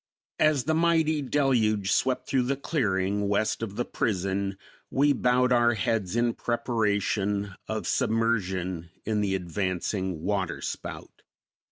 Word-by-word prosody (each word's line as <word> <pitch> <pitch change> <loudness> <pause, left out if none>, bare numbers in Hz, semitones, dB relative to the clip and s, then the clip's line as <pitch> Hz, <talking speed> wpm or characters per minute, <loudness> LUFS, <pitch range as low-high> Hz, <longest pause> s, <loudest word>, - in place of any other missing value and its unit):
As 155 -4 +3
the 160 - 0
mighty 160 -2 +2
deluge 115 -8 +1
swept 130 +5 +1
through 130 - +2
the 140 - +2
clearing 100 - 0
west 105 +2 0
of 105 -3 -4
the 120 - -1
prison, 95 -1 -1 0.3
we 145 +2 +3
bowed 125 0 +2
our 120 -1 +4
heads 105 -1 -1
in 120 0 +2
preparation 105 -4 0
of - - -3
submersion 95 -7 0 0.2
in 105 -1 0
the 100 -2 0
advancing 95 -1 -2
waterspout. 95 -4 -4
105 Hz, 125 wpm, -27 LUFS, 95-125 Hz, 0.3 s, our